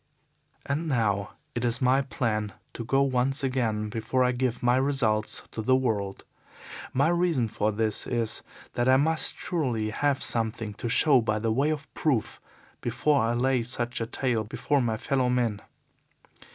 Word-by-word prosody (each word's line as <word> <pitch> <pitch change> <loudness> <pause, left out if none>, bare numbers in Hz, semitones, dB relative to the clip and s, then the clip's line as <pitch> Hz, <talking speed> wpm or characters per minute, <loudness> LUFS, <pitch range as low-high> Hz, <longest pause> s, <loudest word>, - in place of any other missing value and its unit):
"And 150 +4 -2
now 105 -7 0 0.2
it 120 - -3
is 120 -1 +1
my 130 +1 +3
plan 110 -6 -2 0.2
to 115 - -5
go 135 +4 +2
once 135 +1 0
again 115 -5 -1
before 115 +3 0
I 125 - +3
give 125 -1 -2
my 120 0 +4
results 130 -6 +1
to 110 - -4
the 130 +4 +3
world. 105 -7 -1 0.7
My 140 +4 +2
reason 170 -8 +1
for 105 0 -1
this 110 0 -1
is 115 -3 0 0.3
that 120 +1 +1
I 130 - +6
must 160 +3 +1
surely 120 -11 -1
have 140 +4 0
something 110 -2 -1
to 115 +3 -5
show 135 +1 +5
by 110 -1 0
way 115 +7 +1
of 155 -2 -2
proof 135 -8 -1 0.4
before 135 +5 +1
I 115 +1 +1
lay 130 +1 +2
such 120 0 -3
a 115 - -2
tale 120 -2 -1
before 140 +6 0
my 115 -3 0
fellow 130 +2 0
men. 120 -4 0
120 Hz, 165 wpm, -27 LUFS, 110-135 Hz, 0.7 s, I